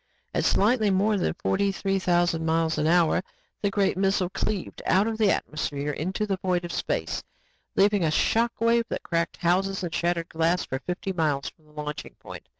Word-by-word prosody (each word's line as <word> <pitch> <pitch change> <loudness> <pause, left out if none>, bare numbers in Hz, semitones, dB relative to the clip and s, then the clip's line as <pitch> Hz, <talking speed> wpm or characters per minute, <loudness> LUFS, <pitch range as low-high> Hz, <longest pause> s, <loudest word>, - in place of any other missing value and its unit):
At - - 0
slightly 215 +1 +3
more 200 +3 +2
than 185 - 0
forty 200 +2 0
three 195 0 -1
thousand 175 -2 +1
miles 160 0 +1
an 150 - +1
hour, 170 0 +4 0.4
the 205 - +1
great 195 -2 +1
missile 190 -1 +1
cleaved 200 -2 -3
out 195 +2 +4
of 225 0 -2
atmosphere 150 -7 0
into 185 +8 -2
the 195 -2 -1
void 180 -2 -1
of 170 - -5
space, - - -2 0.5
leaving 200 -1 +4
a 160 - +2
shock 230 +8 +2
wave 230 +1 +3
that - - -4
cracked 170 0 -1
houses 190 +2 +1
and 170 -2 -4
shattered 170 0 0
glass 165 +2 +1
for 130 - -3
fifty 180 +5 -4
miles 150 -5 0
from 150 -1 -25
launching 150 0 -6
point. - - -11
180 Hz, 180 wpm, -26 LUFS, 165-200 Hz, 0.5 s, hour